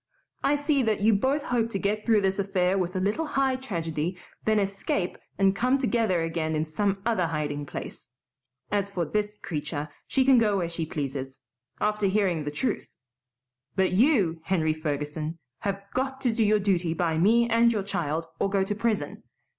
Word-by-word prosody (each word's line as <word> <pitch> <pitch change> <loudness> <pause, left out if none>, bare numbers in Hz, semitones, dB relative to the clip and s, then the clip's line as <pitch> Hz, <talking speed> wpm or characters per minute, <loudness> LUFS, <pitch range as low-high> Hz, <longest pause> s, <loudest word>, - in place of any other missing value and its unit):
"I 290 - +3
see 290 -1 +1
that 220 -4 +1
you 220 +2 +5
both 265 +8 +1
hope 235 -2 0
to 200 - -2
get 210 +3 -1
through 220 -3 +5
this 195 +1 0
affair 190 -1 +1
with 185 -1 -1
a - - +1
little 210 +12 0
high 270 -2 +1
tragedy, 170 - -3 0.3
then 215 0 +3
escape 195 -2 -1 0.2
and 195 0 +3
come 255 +5 +2
together 225 -9 +1
again 165 -1 -1
in 155 +1 0
some 195 +4 -1
other 220 -7 +2
hiding 145 -2 -3
place. 130 - -7 0.6
As 200 -1 0
for 180 -4 -2
this 210 +5 -1
creature, 150 -4 -4 0.2
she 265 -1 +2
can 260 -2 +6
go 210 -3 +2
where 175 -3 -1
she 165 -1 -3
pleases, 135 -3 -4 0.4
after 210 -1 +1
hearing 190 -6 +1
the - - -1
truth; 150 - -3 0.8
but 190 -1 +2
you, 195 - +3
Henry 160 -5 +1
Ferguson, 155 +1 -3 0.2
have 195 -1 -3
got 265 +1 -1
to 245 -4 +2
do 225 - +2
your 215 0 +4
duty 180 -5 +1
by 160 -2 0
me 230 +6 +4
and 235 0 +4
your 210 -4 -1
child 165 -4 -2
or - - +1
go 195 -1 +2
to 195 - -1
prison. 215 0 -1
195 Hz, 185 wpm, -27 LUFS, 165-225 Hz, 0.8 s, can